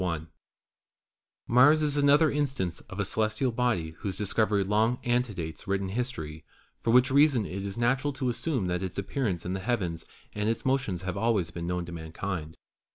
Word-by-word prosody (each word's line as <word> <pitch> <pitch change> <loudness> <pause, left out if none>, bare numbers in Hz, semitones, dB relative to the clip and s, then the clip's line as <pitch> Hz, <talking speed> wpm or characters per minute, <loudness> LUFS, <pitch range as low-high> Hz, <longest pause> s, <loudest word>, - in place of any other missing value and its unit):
CHAPTER 85 -3 -1
XV - - -24 1.2
Mars 145 +6 +5
is 145 -1 +1
another 145 +2 +5
instance 135 - -1
of 95 - -7
a 100 - +1
celestial 110 +5 0
body 115 -10 0
whose 95 -2 -4
dis 105 -2 -2
covery 105 -3 +2
long 110 +4 +2
antedates 110 -10 -2
written 95 0 -1
history, 90 -9 -4 0.4
for - - -2
which 125 +3 +5
reason 140 -5 +4
it 95 +2 -5
is 100 +2 -5
natural 130 +4 +1
to 130 -1 -1
assume 125 - -1
that 90 0 -1
its 95 -2 -4
appearance 100 - -2
in 90 - -2
the 95 - -2
heavens 90 -7 -2 0.3
and 105 +1 -1
its 115 - -2
motions 130 -10 0
have 95 -1 -3
always 105 -8 +1
been 85 0 -5
known 90 0 -2
to 90 - -9
mankind. 80 0 -5
105 Hz, 185 wpm, -28 LUFS, 90-125 Hz, 1.2 s, Mars